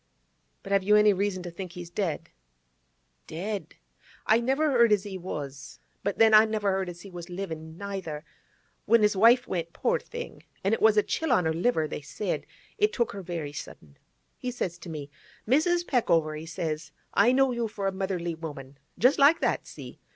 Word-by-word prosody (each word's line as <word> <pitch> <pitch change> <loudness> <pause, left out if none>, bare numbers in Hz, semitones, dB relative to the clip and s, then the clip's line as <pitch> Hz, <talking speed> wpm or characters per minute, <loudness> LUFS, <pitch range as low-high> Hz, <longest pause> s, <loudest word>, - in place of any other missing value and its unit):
But 195 - -8
have 200 -1 +4
you 210 +2 +4
any 210 -1 +6
reason 190 -1 -1
to 175 - -6
think 180 0 -7
he's 175 -1 -8
dead?' 175 -5 -2 1.0
'Dead! 195 +6 -5 0.5
I 220 +1 +4
never 270 +5 +1
heard 235 -3 +5
as 205 -2 +3
he 200 -2 -7
was. 145 -6 -7 0.3
But 200 - -1
then 225 -1 +5
I 215 +1 +9
never 215 -2 0
heard 190 -1 -1
as 175 0 -9
he 195 - -11
was 175 0 -8
livin', 160 -3 -6
neither. 190 -6 -5 0.6
When 230 -1 +4
his 210 -1 +3
wife 235 +5 +5
went, 170 -2 -3
poor 480 +1 +1
thing—an' 470 - -5
it - - 0
was 220 -1 +5
a 210 - +5
chill 320 -3 -1
on 220 -7 +4
the 160 0 +1
liver, 165 -2 +1
they 150 - -6
said; 160 +7 -4 0.3
it 420 +1 +3
took 235 - 0
her 200 - -7
very 165 -5 -5
sudden—he 75 - -10
says 185 -8 -4
to 170 - -9
me, 145 -3 -7 0.4
"Mrs. 345 +7 +3
Peckover," 165 - +1
he 155 +2 -7
says, 155 -1 -4 0.2
"I 245 - +5
know 265 0 +3
you 235 -1 -1
for 205 -2 -5
a 195 - +2
motherly 190 -3 -2
woman"—just 150 - -2
like 295 +4 +6
that—see? - - -3
195 Hz, 185 wpm, -27 LUFS, 165-225 Hz, 1.0 s, I